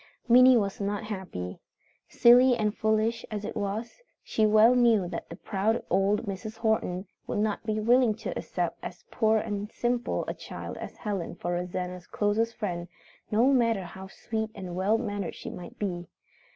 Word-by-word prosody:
Minnie 250 +1 +7
was 200 -2 -1
not 205 +1 -2
happy. 185 - -6 0.5
Silly 245 +1 +6
and 210 -1 0
foolish 220 +1 +1
as 210 -1 -4
it - - -5
was, 215 - -4 0.2
she 215 -1 +2
well 215 +3 +6
knew 230 -6 +4
that 170 -1 -6
the 170 - -7
proud 210 +5 -1
old 195 +4 +2
Mrs. 215 +2 -6
Horton 220 -5 0 0.2
would - - -2
not 210 0 0
be 215 0 0
willing 235 0 +4
to - - -5
accept - - -3
as - - -8
poor 220 -1 +3
and 210 0 -3
simple 240 0 -1
a - - -2
child - - -8
as - - -8
Helen 200 -6 -4
for 175 - -4
Rosanna's 180 0 -4
closest 220 +2 0
friend, 175 -5 -3 0.4
no 240 +6 +4
matter 230 -6 +2
how 190 +2 -9
sweet 220 +3 -4
and 185 -4 -6
well 195 +4 +2
mannered 205 -6 -3
she - - -7
might 175 - -10
be. 175 -4 -3
210 Hz, 170 wpm, -28 LUFS, 190-225 Hz, 0.5 s, Minnie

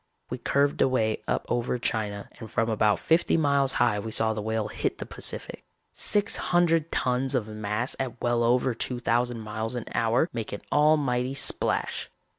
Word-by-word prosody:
We 125 - -3
curved 140 +3 +1
away 110 -4 +2
up - - 0
over 120 +1 0
China 105 -4 -2
and 110 -2 -8
from 115 -1 0
about 105 -1 +3
fifty 165 +1 +2
miles 140 -3 +2
high 120 -4 +2
we 110 - -5
saw 110 0 +1
the 110 - -4
Whale 110 0 -1
hit - - -2
the - - -6
Pacific. - - -7 0.3
Six 205 0 +2
hundred 165 -2 +2
tons 130 +2 0
of 115 -4 0
mass 110 +3 -3
at 125 -2 -3
well 120 0 +1
over 125 +2 +2
two 120 +2 -3
thousand 120 0 0
miles 110 +2 -4
an 120 - -4
hour 115 +7 +2
make 115 -3 -4
an 100 - -5
almighty 140 -4 +2
splash. - - -1
120 Hz, 175 wpm, -27 LUFS, 110-135 Hz, 0.3 s, about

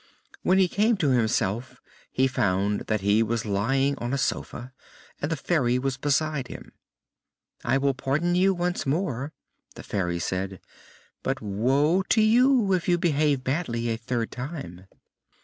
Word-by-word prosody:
When 185 - +3
he 190 -1 +5
came 215 +5 +2
to 145 -7 +1
himself 115 0 0 0.3
he 130 - +2
found 100 -5 0
that 110 -2 0
he 100 +3 +3
was 115 0 -1
lying 135 +8 +1
on 120 +2 -3
a - - -1
sofa, 130 -1 -3 0.5
and 145 - -2
the - - +1
Fairy 135 -5 +1
was 130 0 -2
beside 145 -1 0
him. - - -10 0.9
"I - - +2
will 135 0 +1
pardon 140 +6 0
you 185 +2 +4
once 175 -4 -2
more," 145 -3 -1 0.4
the - - -9
Fairy 90 -3 -2
said, 95 +2 -3 0.6
"but 135 +1 -2
woe 135 - +2
to 225 - +4
you 235 -2 +4
if 180 -2 0
you 175 - +4
behave 150 -5 +1
badly 125 -5 -1
a 115 - 0
third 115 0 -3
time!" 125 - -7
135 Hz, 155 wpm, -26 LUFS, 115-160 Hz, 0.9 s, he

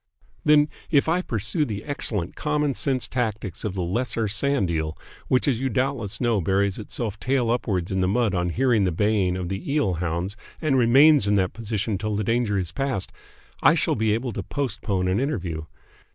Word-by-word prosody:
"Then, 150 0 +5 0.2
if 145 -2 +3
I 170 +3 +2
pursue 110 - -1
the 105 -6 -4
excellent 105 - -2
common 150 -2 0
sense 130 -4 0
tactics 110 -7 -3
of 105 -3 -3
the 90 - -1
lesser 115 +4 -1
sand 110 -2 +1
eel, 80 -1 -2 0.3
which 130 - +2
as 125 -5 +2
you 135 +1 -1
doubtless 120 -3 -1
know 115 -5 +1
buries 95 +3 +1
itself 105 0 -3
tail 125 -3 +1
upwards 100 -7 -1
in 95 - 0
the 90 - +2
mud 110 +1 +1
on 90 -1 0
hearing 120 +1 +2
the 90 - +1
baying 95 0 +1
of 90 -1 -3
the 95 +8 -4
eel 140 -11 +1
hounds 85 +3 -2 0.2
and 155 -4 +1
remains 130 +1 +6
in 105 - +3
that 95 -2 +1
position 110 -3 -2
till 105 0 -2
the 105 - -1
danger 115 -1 +1
is 90 -3 -2
past, 130 0 -2 0.5
I - - +6
shall - - +1
be 110 0 +1
able 120 +2 -3
to - - -4
postpone 105 -8 -2
an 95 +3 +1
interview. 90 - -2
110 Hz, 195 wpm, -24 LUFS, 95-130 Hz, 0.5 s, remains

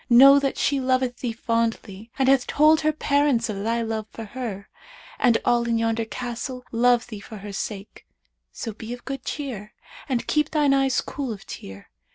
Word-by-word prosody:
Know 275 +4 +8
that 275 -1 -1
she 280 -1 +1
loveth 255 -1 0
thee 245 - -3
fondly 225 -2 -2
and 265 -1 +2
hath 270 -2 +4
told 305 +1 +4
her 310 0 +2
parents 285 -6 +1
of 200 -2 -4
thy 230 +1 0
love 220 -1 -3
for 225 - -8
her, 210 -3 -6 0.5
and 240 -3 +4
all 240 -1 +2
in 230 -1 +1
yonder 225 0 0
castle 250 +2 -5
love 240 +1 +3
thee 215 -4 -8
for 215 +2 -10
her 200 0 -8
sake; 200 0 -6 0.4
so 225 - -6
be 225 +2 -7
of 245 - -10
good 270 -2 -5
cheer 240 -8 -5 0.3
and 250 -3 0
keep 300 -1 +1
thine 295 -3 +3
eyes 270 -2 +2
cool 270 -4 -5
of 205 -3 -8
tear.' 95 0 -10
240 Hz, 190 wpm, -24 LUFS, 225-270 Hz, 0.5 s, Know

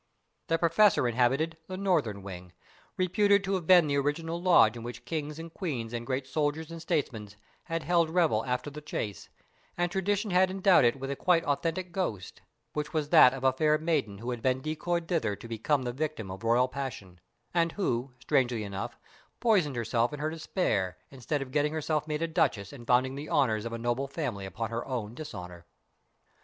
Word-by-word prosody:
The 165 - +2
Professor 165 -3 +4
inhabited 130 +7 +1
the 185 - -5
northern 155 - 0
wing, 90 -2 -9 0.4
reputed 200 +2 +3
to 195 0 -1
have 180 -4 -2
been 180 -3 +7
the 140 -1 0
original 165 +4 -2
lodge 170 -11 +5
in 120 - -7
which 120 +1 -8
kings 150 +1 -4
and 165 0 -8
queens 125 - -4
and 120 0 -4
great 130 0 -1
soldiers 150 +3 -2
and 165 -1 -7
statesmen 120 -10 -2 0.4
had 165 -2 -3
held 170 -1 +2
revel 160 -11 +2
after 125 +3 -2
the 150 +2 -8
chase, 110 -9 -5 0.5
and 175 0 0
tradition 200 +2 0
had 185 +1 +4
endowed 190 -6 +4
it 120 +3 +2
with 135 +1 -4
a - - -2
quite 170 +2 +2
authentic 165 +5 -1
ghost: 170 - -4 0.3
which 150 0 -3
was 150 -2 -1
that 155 -6 +8
of 135 0 -7
a 130 -1 +4
fair 155 +3 +3
maiden 150 -11 -1
who 120 +4 -4
had 120 -2 -4
been 130 +1 +1
decoyed 165 +4 -2
thither 150 - 0
to 115 - -11
become 125 +5 0
the 120 -1 -3
victim 140 -8 -3
of 95 +2 -8
royal 120 +2 +3
passion, 125 -9 -6 0.3
and 170 -1 +2
who, 130 - -1
strangely 120 -2 +1
enough, 100 -1 -5 0.4
poisoned 190 - +2
herself 115 0 0
in 150 - -5
her 155 +1 -1
despair, 105 - -1
instead 135 +2 -2
of 130 - -12
getting 150 +1 +1
herself 155 -1 -1
made 155 +1 -2
a - - +1
duchess 150 - 0
and 120 -4 -11
founding 130 +2 +3
the 145 +3 -7
honours 115 -6 +2
of 115 - -4
a 115 - -3
noble 120 +4 -1
family 125 - -4
on 115 +1 -2
her 115 - -2
own 115 -5 -3
dishonour. 90 - -8
145 Hz, 195 wpm, -29 LUFS, 120-165 Hz, 0.5 s, that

